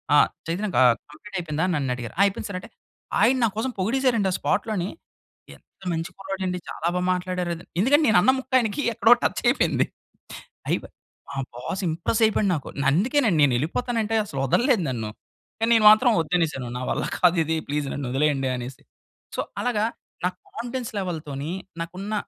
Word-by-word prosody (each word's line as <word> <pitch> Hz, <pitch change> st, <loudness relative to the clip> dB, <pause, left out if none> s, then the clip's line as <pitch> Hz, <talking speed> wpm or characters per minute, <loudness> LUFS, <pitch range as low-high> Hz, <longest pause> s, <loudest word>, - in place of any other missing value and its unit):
"ఆహ్, -, -, +6 dB, 0.2 s
చైతన్య 195 Hz, +5 st, -1 dB
ఆహ్, 120 Hz, -2 st, +6 dB, 0.2 s
కంప్లీట్ 195 Hz, +6 st, -12 dB
అయిపోయిందా?" 160 Hz, -2 st, -2 dB
అని 180 Hz, -, 0 dB
నన్ను 135 Hz, -3 st, -1 dB
అడిగారు, 120 Hz, -2 st, -7 dB
"ఆ! -, -, +6 dB
అయిపోయింది 200 Hz, +1 st, -2 dB
సార్" 185 Hz, -, -4 dB
అంటే, -, -, -12 dB, 0.5 s
ఆయన 260 Hz, +3 st, +5 dB
నా -, -, +5 dB
కోసం 255 Hz, +3 st, -1 dB
పొగిడేసారండి, 230 Hz, 0 st, +2 dB
ఆ -, -, 0 dB
స్పాట్‌లోని. 200 Hz, -5 st, -1 dB, 0.7 s
ఎంత -, -, -25 dB
మంచి 165 Hz, +1 st, -3 dB
కుర్రాడు 195 Hz, 0 st, -5 dB
అండి, 180 Hz, 0 st, -2 dB
చాలా 165 Hz, -, -3 dB
బాగా 180 Hz, 0 st, 0 dB
మాట్లాడారు. 180 Hz, -1 st, -2 dB, 0.3 s
ఎందుకంటే 290 Hz, +7 st, +4 dB
నేను 180 Hz, -, +6 dB
అన్న 260 Hz, -, +5 dB
ముక్క 260 Hz, -, -11 dB
ఆయనికి 225 Hz, +4 st, -1 dB
ఎక్కడో 225 Hz, +1 st, +4 dB
టచ్ -, -, 0 dB
అయిపోయింది. -, -, +2 dB, 0.8 s
అయి -, -, +3 dB, 0.5 s
మా 140 Hz, -, -7 dB, 0.2 s
బాస్ 185 Hz, +10 st, -4 dB
ఇంప్రెస్ 170 Hz, +8 st, -1 dB
అయిపోయాడు, 210 Hz, -2 st, +1 dB
నాకు. 145 Hz, -, -6 dB, 0.2 s
అందుకేనండి, 215 Hz, -, +2 dB
నేనెళ్ళిపోతాను 160 Hz, -, +1 dB
అంటే 220 Hz, +1 st, -1 dB
అసలు 140 Hz, -9 st, -6 dB
వదల్లేదు 235 Hz, -, +3 dB
నన్ను. 115 Hz, -4 st, -3 dB, 0.5 s
కానీ 225 Hz, +1 st, +1 dB
నేను 220 Hz, -2 st, +4 dB
మాత్రం 235 Hz, +3 st, +5 dB
వద్దనేసాను. 155 Hz, -6 st, -1 dB
"నా 125 Hz, -, -5 dB
వల్ల -, -, -1 dB, 0.2 s
కాదు 180 Hz, -1 st, +4 dB
ఇది 160 Hz, +1 st, 0 dB
ప్లీజ్ 145 Hz, -1 st, -1 dB
నన్ను 140 Hz, -3 st, -4 dB
వదిలేయండి" 135 Hz, -1 st, +1 dB
అనేసి. 125 Hz, +2 st, -8 dB, 0.5 s
సో -, -, 0 dB, 0.2 s
అలాగా, 220 Hz, -3 st, +1 dB, 0.4 s
నా -, -, +3 dB, 0.2 s
కాన్ఫిడెన్స్ 245 Hz, 0 st, -5 dB
లెవెల్‌తోని, 155 Hz, -5 st, -4 dB, 0.3 s
నాకున్న 185 Hz, +5 st, -5 dB
185 Hz, 170 wpm, -24 LUFS, 150-220 Hz, 0.8 s, ఆహ్